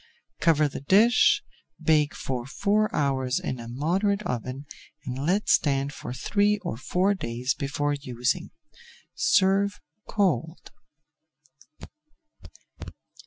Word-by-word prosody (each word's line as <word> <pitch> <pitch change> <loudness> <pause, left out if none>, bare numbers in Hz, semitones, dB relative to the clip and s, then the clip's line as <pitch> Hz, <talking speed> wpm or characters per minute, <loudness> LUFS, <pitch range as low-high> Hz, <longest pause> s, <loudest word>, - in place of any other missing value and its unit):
Cover 155 -2 +3
the 135 - -7
dish, 210 - +4 0.4
bake 150 -2 +2
for 125 -2 -4
four 210 +8 +1
hours 135 -3 0
in 130 - -4
a 115 - -8
moderate 185 - 0
oven, 130 - -4 0.4
and 130 +3 -4
let 195 +4 +1
stand 140 -1 +2
for - - -7
three 205 +10 +1
or - - -3
four 180 - +1
days 125 -7 -2
before 145 +1 -2
using. 135 +3 -2 0.6
Serve 195 +1 +2 0.3
cold. 180 -5 -1
145 Hz, 105 wpm, -26 LUFS, 130-195 Hz, 0.6 s, dish